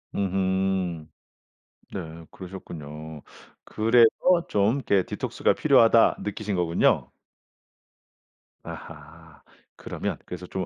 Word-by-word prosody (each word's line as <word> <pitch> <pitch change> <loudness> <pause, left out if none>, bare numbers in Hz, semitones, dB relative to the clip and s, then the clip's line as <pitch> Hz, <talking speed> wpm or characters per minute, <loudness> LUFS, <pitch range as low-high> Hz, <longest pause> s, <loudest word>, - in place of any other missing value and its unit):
음음. 95 -3 -1 0.9
네 80 -3 -7
그러셨군요. 80 -5 -9 0.4
그래서 115 +1 +4 0.4
좀 105 +4 +2
이렇게' 100 -8 +1
디톡스가 - - -1
필요하다.' 115 0 +4
느끼신 105 -1 -3
거군요. 85 -1 +1 1.5
아하. 80 0 -11 0.4
그러면 - - -4
그래서 90 0 -7
좀 95 0 -4
95 Hz, 215 characters per minute, -25 LUFS, 80-100 Hz, 1.5 s, 그래서